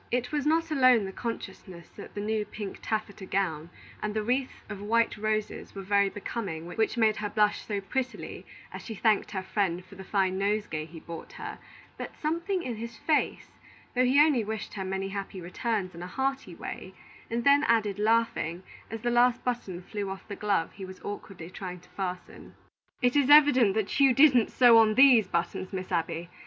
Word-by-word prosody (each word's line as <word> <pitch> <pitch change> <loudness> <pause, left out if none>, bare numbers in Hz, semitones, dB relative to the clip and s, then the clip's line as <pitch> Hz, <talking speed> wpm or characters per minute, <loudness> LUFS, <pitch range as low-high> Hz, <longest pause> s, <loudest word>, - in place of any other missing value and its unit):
It 250 0 -1
was 295 -1 -1
not 325 +1 +2
alone 255 -7 +5
the 190 - -5
consciousness 190 -6 -7
that 205 - -12
the 205 - -3
new 215 0 0
pink 205 -1 -7
taffeta 210 -3 -3
gown 170 -5 -1 0.3
and 210 0 -3
the 215 - 0
wreath 255 +4 -1
of 205 -2 -7
white 230 +2 +2
roses 215 -1 -3
were 195 - -6
very 200 0 +3
becoming 195 -5 -5
which 220 +7 -1
made 220 -2 +3
her 210 -1 -3
blush 210 0 +2
so 205 -2 -1
prettily 255 +6 -4 0.3
as - - -6
she 225 - -6
thanked 215 0 +2
her 190 -3 -4
friend 185 -2 -1
for 185 - -16
the 190 0 -9
fine 190 -1 0
nosegay 200 -6 -1
he 165 +1 -11
brought 165 +1 -9
her, - - -7 0.4
but - - -7
something 340 +4 -1
in 240 -3 -4
his 230 +1 -7
face, 310 -2 0 0.4
though 255 - +3
he 255 +3 +4
only 295 -6 +5
wished 215 0 -5
her 195 - -4
many 190 +1 -3
happy 195 -1 -5
returns 185 +2 -2
in 170 - -9
a 180 - -5
hearty 265 -4 -2
way, 190 +2 -8 0.3
and 235 +1 -1
then 280 +2 +5
added, 215 -3 +2
laughing, 220 -6 +1 0.3
as 225 -1 -6
the 240 +1 0
last 240 0 +3
button 200 -8 -3
flew 205 +1 -4
off 190 0 -8
the 205 - -6
glove 200 -6 0
he 195 - -9
was 185 0 -9
awkwardly 190 -4 -7
trying 180 -1 -7
to 180 - -22
fasten, 185 -2 -6 0.5
"It 245 +1 +3
is 285 -2 +3
evident 275 -8 +7
that 220 +4 -1
you 270 -3 +5
didn't 265 -6 +6
sew 240 -3 +7
on 215 -1 +4
these 255 -6 +7
buttons, 175 +2 -2
Miss 185 -1 -5
Abby. 165 0 -2
210 Hz, 195 wpm, -28 LUFS, 190-240 Hz, 0.5 s, evident